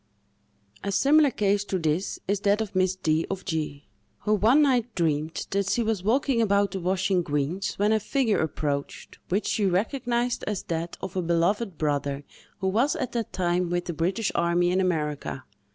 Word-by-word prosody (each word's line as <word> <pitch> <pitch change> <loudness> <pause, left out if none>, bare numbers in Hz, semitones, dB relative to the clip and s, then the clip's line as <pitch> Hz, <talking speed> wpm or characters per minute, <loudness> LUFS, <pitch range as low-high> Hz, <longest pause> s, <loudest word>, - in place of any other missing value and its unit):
A 200 - -2
similar 285 +9 +5
case 205 -4 +1
to 190 - -1
this 165 +2 -1
is 200 +1 +1
that 205 +1 +2
of 215 -3 -4
Miss 185 0 +2
D——, 160 -3 0
of 195 -1 -4
G——, 155 -5 -3 0.3
who 210 - +1
one 230 +9 +5
night 245 -5 +1
dreamed 155 -2 -1
that 200 0 0
she 235 - +1
was 220 -4 -1
walking 245 +3 +2
about 200 -2 +2
the 190 - -3
washing 185 +1 +1
greens, 150 +4 -2
when 205 +2 +2
a 220 - +3
figure 235 -1 +1
approached, 145 -2 -3
which 200 +4 0
she 205 -3 +1
recognised 240 +5 0
as 205 -2 -2
that 165 0 -4
of 190 -1 -6
a 185 - +1
beloved 175 +3 0
brother 145 -2 -1 0.4
who 190 - 0
was 240 - +2
at 260 -7 -3
that 230 -3 -3
time 175 -1 0
with 175 0 -1
the 175 - -3
British 185 +7 0
army 170 +1 +2
in 185 +1 +2
America. 150 -6 -2
190 Hz, 185 wpm, -26 LUFS, 170-215 Hz, 0.4 s, similar